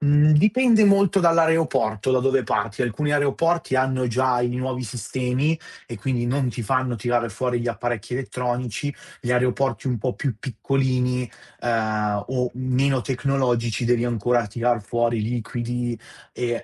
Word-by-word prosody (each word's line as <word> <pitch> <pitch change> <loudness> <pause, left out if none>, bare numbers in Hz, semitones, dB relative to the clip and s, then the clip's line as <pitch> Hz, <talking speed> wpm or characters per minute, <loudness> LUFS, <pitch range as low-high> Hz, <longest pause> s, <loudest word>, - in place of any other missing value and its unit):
mhmm, 150 +1 +5
dipende 220 +6 +5
molto 200 -1 +4
dall'aeroporto 160 - +2
da 130 - +3
dove 135 0 +2
parti. 105 +1 -1
Alcuni 145 +5 -1
aeroporti 145 +2 +1
hanno 130 -1 +1
già 125 +1 +1
i 120 0 0
nuovi 130 0 -3
sistemi 125 +7 -1 0.3
e 120 - -7
quindi 120 +1 -1
non 130 +1 0
ti 120 0 -5
fanno 130 +2 0
tirare 120 +1 0
fuori 120 +3 -2
gli 120 - -4
apparecchi 120 -1 -3
elettronici, 125 +1 -3 0.3
gli 125 - -1
aeroporti 125 +1 0
un 125 -2 -1
po' 125 +3 -2
più 130 -7 -3
piccolini, 125 0 -1 0.3
ehm, 110 -3 0
o 125 -1 -1
meno 130 +1 +1
tecnologici 125 -3 0
devi 120 0 +2
ancora 120 0 +1
tirar 120 +2 0
fuori 120 +1 0
liquidi 120 +1 -3 0.3
e, 120 -1 -2
125 Hz, 145 wpm, -23 LUFS, 120-135 Hz, 0.3 s, mhmm